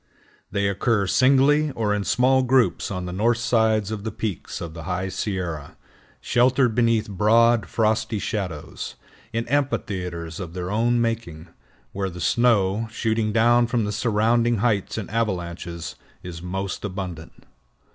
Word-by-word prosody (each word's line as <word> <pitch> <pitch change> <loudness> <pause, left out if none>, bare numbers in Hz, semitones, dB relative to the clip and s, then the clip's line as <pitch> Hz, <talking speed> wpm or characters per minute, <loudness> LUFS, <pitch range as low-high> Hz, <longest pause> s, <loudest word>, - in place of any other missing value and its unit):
They 100 0 0
occur 100 +1 +1
singly 140 +7 +4
or 105 -2 0
in 105 -1 -2
small 130 +4 +3
groups 130 -1 +2
on 90 -3 -4
the 90 - -5
north 115 +5 +2
sides 110 -3 +1
of 105 -2 -4
the 110 - -2
peaks 105 -2 -4
of 80 -2 -6
the 85 -2 -8
High 95 +1 -2
Sierra, 90 -7 -4 0.4
sheltered 125 0 +2
beneath 115 -1 +2
broad 110 +3 +3
frosty 110 0 0
shadows, 95 -7 -4 0.4
in 115 +1 -2
amphitheaters 90 - -2
of 90 -2 -7
their 90 +1 -4
own 120 +3 +2
making, 110 -8 -3 0.4
where 95 -1 -2
the 90 0 -9
snow, 110 0 +2
shooting 110 -2 0
down 120 +2 +4
from 115 -2 0
the 105 - -2
surrounding 115 +2 +2
heights 105 -2 0
in 110 - -4
avalanches, 85 -6 -3 0.3
is 85 -2 -7
most 95 +1 -4
abundant. 90 -5 -6
105 Hz, 145 wpm, -23 LUFS, 95-115 Hz, 0.4 s, singly